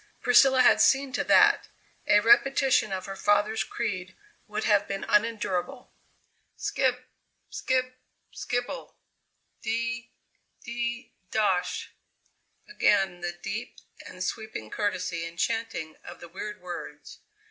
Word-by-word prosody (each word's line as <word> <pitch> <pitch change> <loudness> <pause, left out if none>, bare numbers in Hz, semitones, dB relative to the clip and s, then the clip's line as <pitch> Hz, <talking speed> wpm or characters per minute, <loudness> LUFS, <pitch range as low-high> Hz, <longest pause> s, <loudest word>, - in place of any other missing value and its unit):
Priscilla 260 +1 +5
had - - +5
seen 270 -1 +3
to - - 0
that. - - +5 0.4
A - - +6
repetition 270 - +4
of 190 0 -3
her 195 -1 -6
father's 205 +2 +2
creed 190 -5 -4 0.3
would 210 +1 -3
have 205 -2 +3
been 195 0 -4
unendurable. 225 +2 -1 0.6
"Skib, 255 -1 0 0.5
skib, 255 -1 -1 0.4
skibble 245 +2 -4 0.7
de 230 +1 -2 0.6
de 240 0 -4 0.2
dosh!" 195 -5 0 0.8
Again 195 - +1
the 175 0 -3
deep - - -5 0.3
and - - -7
sweeping 220 - -5
courtesy 185 -5 -2
and 165 0 -8
chanting 225 -7 -2
of - - -10
the 170 - -10
weird 210 +3 -7
words. 175 -1 -8
220 Hz, 115 wpm, -27 LUFS, 190-245 Hz, 0.8 s, A